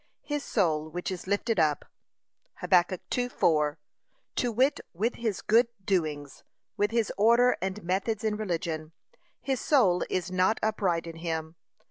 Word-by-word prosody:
'His 295 -1 -3
soul, 155 -7 0
which 180 +3 -4
is 185 0 -6
lifted 205 +1 0
up,' 150 -2 +2 0.7
(Hab. - - -8
2:4) 175 -4 +2 0.6
to 245 - +1
wit, 260 +6 +2 0.2
with 220 +7 0
his 220 -5 -3
good 230 +3 +4 0.2
doings, 155 -7 -2 0.3
with 205 0 +1
his 230 -1 0
order 235 +4 +5
and 190 +2 -3
methods 195 +5 -1
in 215 -1 0
religion, 165 -6 -3 0.5
'his 265 -2 -1
soul 200 - +3
is 185 0 -2
not 185 +4 +2
upright 190 -6 0
in 165 -1 -8
him.' 160 -1 -4
190 Hz, 140 wpm, -28 LUFS, 165-225 Hz, 0.7 s, order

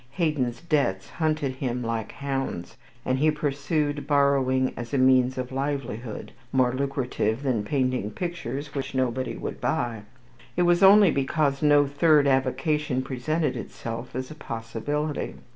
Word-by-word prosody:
Haydon's 145 -8 -1
debts 140 - 0
hunted 155 -5 -1
him 125 -2 -2
like 115 -2 -3
hounds, 135 -11 -4 0.3
and 130 0 +1
if - - -3
he 155 - +5
pursued 145 0 -1
borrowing 135 -3 +2
as 120 +3 -5
a - - +2
means 130 0 +4
of 125 0 -4
livelihood, 130 -5 -4 0.2
more 125 -2 +3
lucrative 130 -3 -1
than 125 -6 0
painting 130 -3 0
pictures 145 -2 -5
which 135 -1 -4
nobody 130 0 -1
would - - -6
buy, 115 -3 -1 0.6
it 180 - +4
was 175 0 +3
only 195 -1 +8
because 140 +1 0
no 145 -1 +5
third 145 +1 +4
avocation 135 +1 +1
presented 135 +3 -1
itself 115 0 -6
as 130 +2 -4
a - - -8
possibility. 140 +4 -3
135 Hz, 145 wpm, -26 LUFS, 125-150 Hz, 0.6 s, only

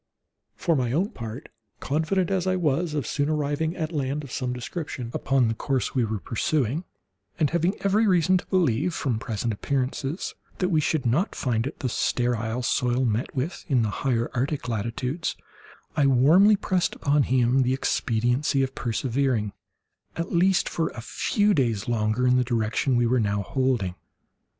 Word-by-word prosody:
For 170 -3 +1
my 125 -3 0
own 185 +8 +1
part, 115 - -7 0.3
confident 165 +6 0
as 190 -1 0
I 185 - +2
was 160 -1 0
of 145 -5 -1
soon 145 +4 -1
arriving 155 +2 -1
at 160 -3 -3
land 145 -1 -2
of 140 - -10
some 125 -1 -2
description 125 -1 -5
upon 135 -3 +2
the 110 - 0
course 130 +2 -1
we 130 - +2
were 110 -1 -1
pursuing, 135 - -1 0.5
and 155 -4 +1
having 170 +3 +1
every 210 +3 +3
reason 185 -1 +4
to - - -10
believe, 165 - +1
from 120 -5 -1
present 115 0 -2
appearances, 135 - -2 0.2
that 180 - 0
we 160 -4 +3
should 150 -2 0
not 145 - +1
find 115 -1 0
it 145 - -8
the 130 - 0
sterile 120 0 -1
soil 125 +2 +1
met 115 +4 -1
with 140 +7 -3
in 130 -5 +2
the 105 - -1
higher 120 -4 0
Arctic 135 +2 -2
latitudes, 120 - -2 0.6
I 145 -2 +3
warmly 160 +11 +6
pressed 185 -2 0
upon 145 +1 +2
him 125 0 +3
the 130 +1 +2
expediency 125 +3 +1
of 135 0 -3
persevering, 120 -3 -1 0.6
at 170 +2 -3
least 180 +2 +3
for 165 - -1
a 115 - -8
few 205 - +1
days 115 - 0
longer, 110 +1 +1
in 125 0 +4
the 125 - +3
direction 120 +2 0
we 120 0 +3
were 125 +2 +2
now 105 -2 0
holding. 125 -7 0
135 Hz, 170 wpm, -25 LUFS, 120-160 Hz, 0.6 s, warmly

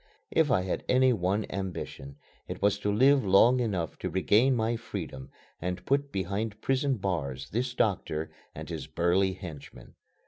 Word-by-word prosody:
If 160 -2 +3
I 105 -8 +3
had 95 - -3
any 130 0 +5
one 100 +1 0
ambition 90 -7 -5 0.3
it - - -6
was 100 0 +2
to 105 0 0
live 135 +5 +5
long 105 +6 +5
enough 95 -9 -2
to - - -3
regain 110 +8 +3
my 115 0 0
freedom 95 - -6 0.3
and 90 +1 -4
put 140 +1 +1
behind 100 +3 -3
prison 135 +2 +1
bars 70 -9 -3
this 120 +3 -2
doctor 80 -8 -1 0.2
and - - -7
his - - -5
burly 90 +3 +2
henchmen. 85 -6 -10
100 Hz, 160 wpm, -29 LUFS, 90-120 Hz, 0.3 s, any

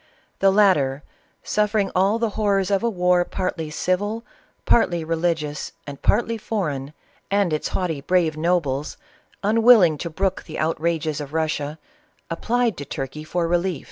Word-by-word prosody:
The 195 - +5
latter, 150 -9 +3 0.4
suf 210 0 0
i'vring 200 -2 +1
all 195 +4 +3
the 230 -2 -1
horrors 200 -2 +1
of 195 - +2
a 235 - +1
war 180 -3 +2
partly 175 -3 -3
civil, 205 +8 -1 0.4
partly 175 -8 +2
reli 165 +1 +1
gious, 150 -1 -6
and 140 -1 -8
partly 230 -1 +1
foreign, 150 -11 -3 0.4
am^Ls 190 -7 +1
haughty, 165 -6 -2
brave 170 -1 +1
no 170 +3 +2
Lies, 145 -2 -3 0.5
unwilling 215 - +5
to 170 - -4
brook 190 +3 -2
the 160 - -8
outn^es 160 -1 -1
of 145 0 -8
Russia, 155 -2 -1 0.5
ap 165 - -4
plied 240 -4 +1
to 145 - -6
Turkey 135 +2 -5
for 170 +2 -1
relJw. 175 -2 0
175 Hz, 155 wpm, -23 LUFS, 155-200 Hz, 0.5 s, The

